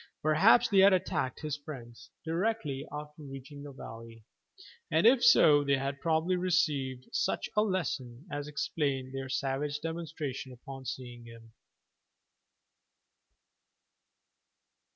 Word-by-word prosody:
Perhaps 195 +11 +5
they 200 -2 +4
had 195 +1 +7
attacked 130 -7 -1
his 150 -2 -3
friends 130 -6 -10 0.2
directly 165 -5 -1
after 150 +1 -8
reaching 135 0 -9
the 145 0 -8
valley, 115 -3 -10 0.7
and - - +2
if 245 +1 +6
so 150 -11 +7
they 140 -1 +2
had 135 0 -3
probably 165 +2 +1
received 150 -8 0
such - - 0
a 210 - +4
lesson 150 - -2
as 145 0 -4
explained 140 -3 -2
their 135 -1 -5
savage 140 +2 -2
demonstration 155 -5 -5
upon 135 +2 -10
seeing 120 -2 -7
him. 115 -1 -14
145 Hz, 115 wpm, -30 LUFS, 130-165 Hz, 0.7 s, had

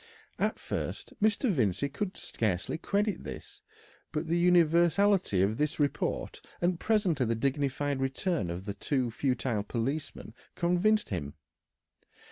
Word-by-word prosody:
At - - +1
first - - -4
Mr. 215 +3 +3
Vincey 125 - +1
could 185 +8 -4
scarcely 105 - -2
credit 205 +3 0
this, - - -9 0.5
but 155 +1 -2
the 170 +2 +1
universality 175 - +4
of 105 +3 +1
the 150 0 +1
report, 145 -2 -1 0.2
and 175 0 +1
presently 180 - +2
the 115 - +1
dignified 140 +2 0
return 135 - -1
of 90 +4 -5
two 130 -5 0
futile 125 -3 0
policemen, 120 +4 -4 0.2
convinced 180 +5 +2
him. 75 -7 -4
145 Hz, 120 wpm, -30 LUFS, 115-180 Hz, 0.5 s, universality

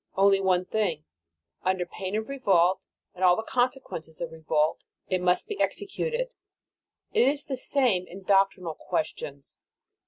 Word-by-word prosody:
Only 195 0 +5
one 185 -1 +2
thing. 185 -8 -1 0.6
Under 185 -1 0
pain 190 +2 -5
of 220 0 -2
revolt 190 -9 +3 0.3
and 185 - -5
all 180 -1 +7
the 220 - -3
consequences 245 - -2
of 170 -2 -4
revolt, 155 -1 0 0.3
it 185 -1 +1
must 180 - +2
be 420 -3 -4
executed. 470 +5 -1 0.8
It 245 - +4
is 285 +1 +1
the 270 - -3
same 250 -8 +1
in 190 +2 -10
doctrinal 195 -3 +2
questions. 145 -3 -4
190 Hz, 145 wpm, -27 LUFS, 175-245 Hz, 0.8 s, all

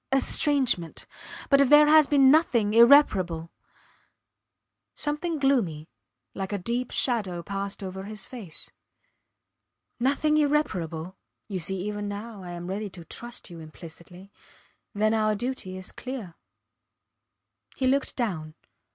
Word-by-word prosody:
estrangement; 270 - +1 0.5
but 275 0 +6
if 275 - +3
there 295 0 +8
has 305 -1 +6
been 275 -2 +5
nothing 240 -9 +3
irreparable.... 195 - +5 1.4
Something 300 +3 -2
gloomy, 215 - 0 0.4
like 190 0 -5
a 205 - -1
deep 235 +6 -2
shadow 195 -9 -1
passed 200 +2 -5
over 190 0 -6
his 210 -1 -7
face.... 225 - -9 1.3
Nothing 285 +4 +2
irreparable 185 - -1 0.3
you 195 -3 -4
see 185 +3 -4
even 205 +1 -4
now 205 +1 -7
I 175 -1 -8
am 175 0 -7
ready 200 +3 -4
to 175 -3 -11
trust 240 +1 -7
you 170 - -9
implicitly 170 +4 -12 0.6
then 215 +2 +2
our 215 -1 +1
duty 220 -5 -5
is 185 - -7
clear. 250 -9 -7 1.4
He 265 - -2
looked 270 +1 +1
down. 160 - -3
210 Hz, 125 wpm, -26 LUFS, 185-265 Hz, 1.4 s, there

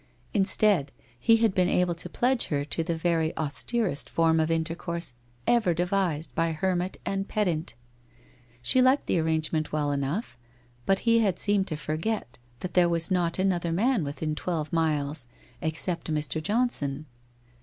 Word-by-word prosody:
Instead, 195 -6 +3 0.3
he 225 - +5
had 225 -3 +2
been 180 -2 +2
able 180 -1 +2
to 165 - -6
pledge 250 0 +1
her 145 -2 -2
to 165 +3 -2
the 165 0 -2
very 160 -1 0
austerest 155 - 0
form 165 -1 +2
of 160 0 +1
intercourse 165 -1 -2 0.3
ever 220 -8 +3
devised 175 -3 -1
by 165 0 0
hermit 180 +2 -1
and 195 0 -2
pedant. 175 -6 -1 0.9
She 255 - +5
liked 260 +3 +4
the 175 - +1
arrangement 160 -1 0
well 150 -1 0
enough, 140 - -3 0.5
but 195 0 +2
he 230 -1 +4
had 200 -6 +1
seemed 205 -2 +2
to 155 - -3
forget 155 - -3 0.2
that 185 - -5
there 175 -1 +4
was 165 0 0
not 175 -2 +1
another 180 -3 0
man 220 +3 +2
within 150 +2 -3
twelve 155 -1 -3
miles 150 -5 0 0.3
except 160 +2 -2
Mr. 150 -1 -1
Johnson. 155 - 0
170 Hz, 155 wpm, -27 LUFS, 155-195 Hz, 0.9 s, he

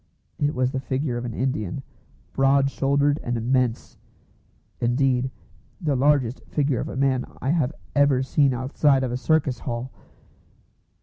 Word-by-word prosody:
It 145 0 0
was 125 0 +1
the 130 - -2
figure 130 0 -2
of 120 - -4
an 115 - -5
Indian, 130 -2 -2 0.5
broad 135 0 +3
shouldered 140 +2 +1
and 120 0 -2
immense; 125 0 -1 0.8
indeed, 125 +1 +1 0.5
the 155 -7 0
largest 130 -2 +2
figure 140 -5 0
of - - -3
a - - -6
man 135 -2 +2 0.2
I 135 - 0
have 155 -4 +1 0.2
ever 140 -2 +4
seen 140 +1 +2
outside 130 +2 +2
of 125 - -2
a - - -1
circus 140 -2 +1
hall. 120 +2 -4
130 Hz, 145 wpm, -24 LUFS, 125-140 Hz, 0.8 s, ever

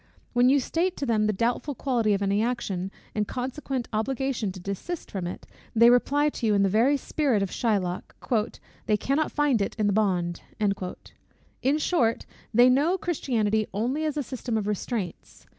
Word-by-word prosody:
When 245 +1 +5
you 280 +1 +5
state 345 +7 -1
to 280 - -2
them 215 -3 +2
the - - +3
doubtful 240 +7 -1
quality 230 -6 +1
of 200 - -2
any 200 +1 +2
action, 200 -6 -2 0.2
and 210 - +1
the - - -9
consequent 260 0 -3
obligation 250 -1 -1
to 185 - -9
desist 200 - -5
from 185 -3 -3
it, 180 - -7 0.3
they 235 +1 +7
reply 290 +4 +3
to 240 -5 -3
you 210 - +3
in 200 - +4
the 195 - +3
very 240 +8 +3
spirit 270 -7 0
of 195 - -3
Shylock, 195 -6 -1 0.7
"they 210 -2 +3
cannot 280 +8 0
find 290 -7 +2
it 200 - -2
in 215 - 0
the 205 - +2
bond." 180 -5 0 1.2
In 275 +3 +2
short, 265 -8 +1 0.3
they 240 +2 +6
know 290 +9 +3
Christianity 220 - 0
only 250 +9 0
as 305 -1 -1
a 290 - 0
system 245 -2 -3
of 210 - -1
restraints. 210 -2 -4
235 Hz, 180 wpm, -26 LUFS, 205-275 Hz, 1.2 s, they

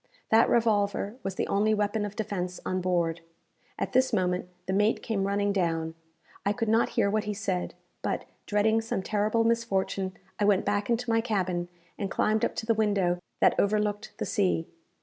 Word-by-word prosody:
That 225 +1 +6
revolver 210 -1 +1
was 195 -1 -4
the - - 0
only 215 +2 +2
weapon 210 0 0
of 205 0 -6
defence 185 -4 -3
on 185 0 -1
board. 170 -2 0 0.6
At - - -3
this 260 0 +4
moment 180 -4 0 0.2
the 190 - -2
mate 210 +3 +2
came 195 -3 -1
running 200 0 +1
down. 165 -4 0 0.5
I 200 - +2
could 230 -1 -2
not 225 +1 +3
hear 215 -3 +4
what 210 +1 0
he 210 0 -2
said, 190 -3 -2 0.3
but, - - -2 0.2
dreading 220 +2 +3
some 225 -4 -3
terrible 215 +3 +1
misfortune, 195 -5 0 0.2
I 205 - +3
went 200 -2 +3
back 205 +1 0
into 240 +1 0
my 225 0 +3
cabin, 185 -6 -1 0.3
and 200 - -2
climbed 215 +2 +1
up - - 0
to - - -3
the 230 - +3
window 200 -5 +1 0.2
that - - +6
overlooked 210 0 0
the - - -2
sea. 185 -6 +1
205 Hz, 185 wpm, -28 LUFS, 190-220 Hz, 0.6 s, That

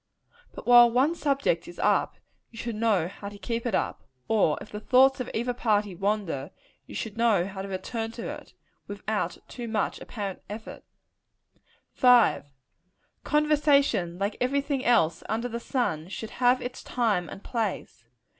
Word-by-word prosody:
But - - -9
while 240 -1 +8
one 260 +7 +2
subject 275 - 0
is 175 - -11
up, - - +1 0.3
you 230 - -15
should 235 0 -4
know 210 -6 +2
how 200 +2 -8
to 205 - -11
keep 230 +4 -3
it 220 - 0
up; - - -2 0.2
or 205 -9 +2
if - - -11
the 210 - -5
thoughts 265 +4 +4
of 255 - -4
either 240 +2 -1
party 210 -5 +1
wander, 190 -7 -2 0.4
you - - -10
should 220 -1 -5
know 220 -7 +3
how 190 0 -6
to 195 - -6
return 225 +4 -4
to 230 - -6
it, - - -9 0.3
without 205 +1 -3
too 240 -2 -7
much 220 -2 -1
apparent 200 -5 -5
effort. 215 +2 -8 1.1
5. 245 - +5 0.8
Conversation, 285 - +2
like 200 +3 -2
every 275 +3 +2
thing 275 -2 -2
else 215 -10 +3
under 225 +3 -1
the 235 -1 -4
sun, 175 - -2
should 215 +3 -7
have 250 0 +2
its 245 +1 -6
time 210 -9 0
and 195 - -10
place. 210 - -3
225 Hz, 165 wpm, -27 LUFS, 200-245 Hz, 1.1 s, while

